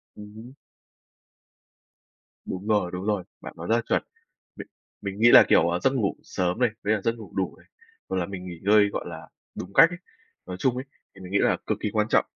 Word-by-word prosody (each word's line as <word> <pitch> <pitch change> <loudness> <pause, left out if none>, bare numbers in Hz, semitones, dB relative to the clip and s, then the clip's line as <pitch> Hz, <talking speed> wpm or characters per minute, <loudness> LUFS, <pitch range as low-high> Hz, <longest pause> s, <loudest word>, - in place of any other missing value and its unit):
Ừm 105 0 -11
hưm. 115 +4 -11 1.9
Đúng 95 +3 -6
rồi 105 -5 +1
đúng 90 +2 -5
rồi. 105 -3 0 0.2
Bạn - - -9
nói 85 +1 -7
rất 115 - +3
là 120 - +1
chuẩn, - - 0 0.5
Mình - - -9 0.3
mình 100 0 -5
nghĩ 120 +2 +6
là, - - +10
kiểu, 85 - +4
ờ, 85 +1 -1
giấc 130 +9 +2
ngủ 110 -7 0
sớm 90 +2 -2
này, 125 -2 +3
với 105 - +2
là 105 - -1
giấc 115 +3 0
ngủ 110 -4 -11
đủ 95 -2 -2
này, - - -22 0.4
hoặc - - -1
là 90 - 0
mình 95 -1 -8
nghỉ 85 -2 -8
ngơi, 105 +1 +5
gọi - - -5
là, - - -9 0.3
đúng 95 +2 -7
cách 165 - +7
ấy, 175 - -7 0.5
nói 90 0 -6
chung 130 +2 +1
ấy, 130 +2 -5 0.3
thì 95 - -14
mình 90 0 -10
nghĩ 100 - +2
là - - +2
cực - - 0
kỳ 105 - -1
quan 105 -1 +1
trọng - - +3
100 Hz, 230 wpm, -25 LUFS, 95-110 Hz, 1.9 s, là